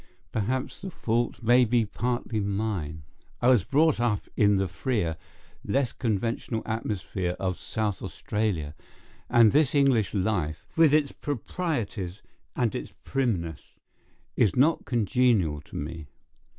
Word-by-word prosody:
Perhaps 130 +5 -2
the 190 - -6
fault 120 -6 -1
may 120 +3 +6
be 120 -1 +2
partly 120 +1 -2
mine. 100 -7 -2 0.4
I 120 - +3
was 120 -7 +5
brought 155 0 +3
up 115 -4 +1
in 105 -1 +4
the 95 0 +1
freer, 85 -1 -1 0.5
less 135 -2 0
conventional 115 0 -2
atmosphere 100 -5 -2
of 95 -2 -2
South 105 -3 -2
Australia, 100 -9 -2 0.6
and 115 -3 +6
this 150 -1 +3
English 130 -8 +3
life, 90 -6 -1
with 160 -3 +6
its 150 -2 +3
proprieties 120 - -3 0.3
and 120 -4 +1
its - - -5
primness, 95 - -2 0.6
is 105 - +3
not 150 +6 +3
congenial 110 - +2
to 75 - -14
me. 75 +1 -5
110 Hz, 125 wpm, -27 LUFS, 95-125 Hz, 0.6 s, may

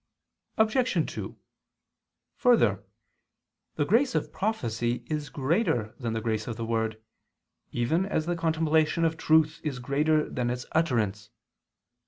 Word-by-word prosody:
Obj. 220 - +2
2: - - -6 1.0
Further, 115 - +3 0.9
the 145 - +1
grace 245 - +2
of - - -1
prophecy 120 - -1
is 150 -2 -3
greater 140 - 0
than 115 -3 -2
the 110 - -2
grace 110 -1 -2
of 115 - -3
the 115 - -3
word, 110 -1 -1 0.7
even 160 +11 0
as 160 -6 -1
the 175 +1 -1
contemplation 160 0 +2
of 165 0 +1
truth 155 -1 +2
is 150 -5 -2
greater 150 +5 +1
than 125 -1 -2
its 125 0 -3
utterance. 110 -10 0
150 Hz, 130 wpm, -27 LUFS, 115-165 Hz, 1.0 s, Further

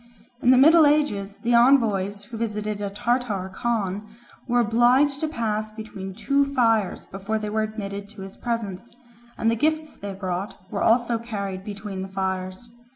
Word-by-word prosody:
In 245 - +3
the 255 - +7
middle 315 +3 +7
ages 210 -10 +1
the 240 +1 +2
envoys 215 -6 +3
who 220 +3 -10
visited 210 -2 -3
a 200 - -2
Tartar 210 -3 -1
Khan 210 -2 -2 0.4
were 245 0 +2
obliged 245 +5 +3
to 315 - 0
pass 220 -7 -2
between 210 -3 -8
two 280 +6 +2
fires 225 -6 +2
before 195 +3 -3
they 210 -1 -4
were 220 +1 +1
admitted 200 -2 -5
to 205 -2 -10
his 195 0 -9
presence, 230 -2 -4 0.5
and 225 0 +2
the - - +1
gifts 310 +4 0
they 200 -1 -6
brought 190 0 -4
were 200 - -2
also 235 0 +3
carried 200 -5 -5
between 200 -1 -6
the 190 - -4
fires. 190 +2 -3
215 Hz, 165 wpm, -24 LUFS, 200-240 Hz, 0.5 s, the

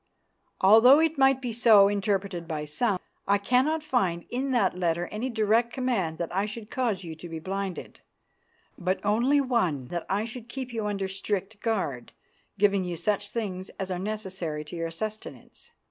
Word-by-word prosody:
Although 225 +8 +8
it 320 -2 +1
might 270 0 +4
be 240 -2 -2
so 220 -4 +6
interpreted 195 -3 -1
by 155 -2 -3
some, 190 +6 0 0.3
I 200 +1 +4
cannot 260 +9 +1
find 190 - 0
in 260 +3 -1
that 235 -9 +2
letter 175 -1 0
any 225 +5 -3
direct 225 +1 +2
command 230 -12 -1
that 170 +1 -4
I 200 +2 +1
should 215 0 -8
cause 230 -7 -1
you 165 -2 -6
to 165 +2 -10
be 165 - -5
blinded, 190 +2 -5 0.8
but 185 +1 0
only 240 +8 +3
one 185 - 0
that 175 -1 -4
I 205 +3 0
should 235 0 -8
keep 255 -1 -6
you 220 -2 -2
under 200 -2 -2
strict 195 +2 -3
guard, 185 - -2 0.4
giving 200 -1 +3
you 175 -1 -3
such 205 +3 -1
things 190 -5 -4
as 190 -1 -3
are 180 - -2
necessary 190 -7 -4
to 155 - -8
your 165 -1 -3
sustenance. 215 +6 -7
200 Hz, 175 wpm, -27 LUFS, 180-235 Hz, 0.8 s, Although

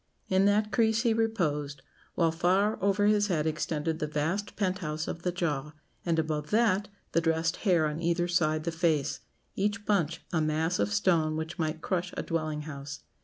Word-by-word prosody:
In 190 +1 +4
that 210 +1 +2
crease 220 +3 +2
he 230 -3 +3
reposed, 150 -11 -1 0.3
while 165 -2 +3
far 185 +6 +2
over 200 +1 +2
his 205 0 +3
head 160 -6 0
extended 155 0 -1
the 150 - -1
vast 160 +8 -2
pent 190 -2 0
house 155 -2 -3
of 165 - -5
the 180 - 0
jaw; 150 -4 -2 0.3
and 170 -2 0
above 155 -2 -1
that, 210 -3 +2 0.2
the 165 - +2
dressed 165 0 +1
hair 175 -6 +3
on 155 +2 -2
either 170 +1 +1
side 155 -3 +1
the 170 - -1
face 165 -4 0 0.4
each 210 +2 -1
bunch 175 -6 +1
a 160 - +2
mass 160 +3 0
of - - +1
stone 170 -8 +2
which 160 +2 -5
might 155 0 -1
crush 180 -1 -2
a - - -1
dwelling 155 -2 -2
house. 140 -1 -7
170 Hz, 185 wpm, -29 LUFS, 155-195 Hz, 0.4 s, In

